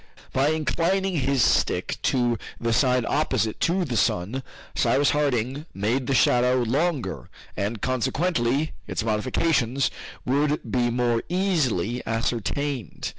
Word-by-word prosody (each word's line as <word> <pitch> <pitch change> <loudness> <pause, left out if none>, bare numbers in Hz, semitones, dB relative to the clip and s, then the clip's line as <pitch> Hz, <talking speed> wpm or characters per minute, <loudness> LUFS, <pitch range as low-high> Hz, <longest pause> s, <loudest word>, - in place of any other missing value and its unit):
By 135 +2 +2
inclining 175 +4 0
his 135 -2 +2
stick - - +1
to 120 -3 +1 0.2
the 115 0 0
side 125 -1 +3
opposite 130 -7 0
to 180 +2 +1
the 125 -6 -3
sun, 105 +5 0 0.3
Cyrus 145 0 +2
Harding 140 0 -1
made 115 +6 0
the 135 - +1
shadow 125 +1 +3
longer, 140 +5 -1 0.3
and 105 +1 -3
consequently 135 +2 0 0.2
its - - -2
modifications 125 +4 +1 0.3
would 145 +3 +1
be 120 -1 +2
more 120 -1 +1
easily 135 - 0
ascertained. 120 +4 -2
130 Hz, 120 wpm, -25 LUFS, 115-150 Hz, 0.3 s, side